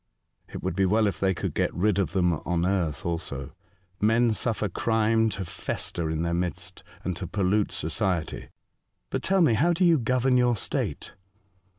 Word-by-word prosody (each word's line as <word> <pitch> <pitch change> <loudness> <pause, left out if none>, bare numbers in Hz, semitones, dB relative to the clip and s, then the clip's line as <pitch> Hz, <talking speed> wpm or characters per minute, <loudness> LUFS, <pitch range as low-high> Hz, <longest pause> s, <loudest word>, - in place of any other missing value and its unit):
" - - -46
It - - -7
would - - -2
be 95 0 +2
well 110 +3 +3
if 100 - -1
they 95 -1 +1
could - - -3
get - - 0
rid 100 +1 +2
of 90 -6 0
them 90 -2 +2
on 85 +2 -1
earth 90 -6 -1
also. 80 -6 -4 0.5
Men 115 +2 +3
suffer 110 -1 -1
crime 110 +3 +2
to 100 -3 -4
fester 85 0 -4
in 80 +1 -1
their 85 0 -1
midst, 85 -2 -3 0.2
and 90 - -2
to 90 - -5
pollute 100 +2 +1
society. 90 -1 -2 0.6
But - - -1
tell 190 0 +2
me 155 -9 +5
how 155 +10 +3
do 180 +2 +2
you 165 -3 +5
govern 125 +2 +2
your 125 -1 +3
state - - -3
100 Hz, 185 wpm, -26 LUFS, 85-115 Hz, 0.6 s, me